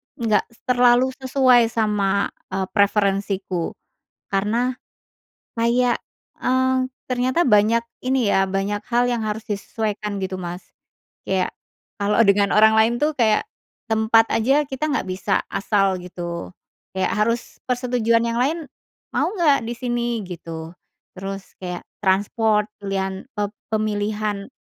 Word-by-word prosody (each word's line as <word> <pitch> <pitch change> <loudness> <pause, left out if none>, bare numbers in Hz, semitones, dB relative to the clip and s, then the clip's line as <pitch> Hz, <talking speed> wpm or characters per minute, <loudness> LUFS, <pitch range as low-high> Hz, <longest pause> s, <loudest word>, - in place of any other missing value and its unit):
nggak 215 -4 +1 0.2
terlalu 250 +1 +4
sesuai 260 -3 +4
sama, 210 -3 0 0.2
eee, 190 - 0
preferensiku, 200 -3 0 0.5
karena 225 +6 0 0.8
kayak, 240 +1 +2 0.4
eee, 260 0 +2 0.2
ternyata 255 +6 +1
banyak 225 0 +4 0.2
ini 255 -5 +1
ya, 195 0 +3
banyak 195 +2 -1
hal 240 0 +3
yang 245 -1 0
harus 215 0 -3
disesuaikan 210 0 -3
gitu, 190 -1 -3
Mas. 175 +1 -6 0.6
Kayak 190 -1 0 0.5
kalau 210 +3 +3
dengan 200 0 +3
orang 220 +1 +7
lain 220 +2 +4
tuh 300 +5 +1
kayak 225 -6 +2 0.4
tempat 220 0 +4
aja 270 +6 +3
kita 270 +2 -3
nggak 295 - 0
bisa 185 +1 0
asal 195 -2 +1
gitu, 175 -1 -6 0.4
kayak 190 - +1
harus 230 +2 -1
persetujuan 245 -2 +1
yang 235 0 -1
lain, 315 +6 0 0.5
"Mau - - +1
nggak 310 -6 +4
disini?" 240 -1 -2
gitu, 165 -2 -7 0.4
terus 195 +1 -6
kayak 180 -1 -5 0.2
transport 210 +2 +2
pilihan 195 -1 -3
e 210 - 0 0.3
pemilihan 210 -1 -1
215 Hz, 120 wpm, -22 LUFS, 195-245 Hz, 0.8 s, orang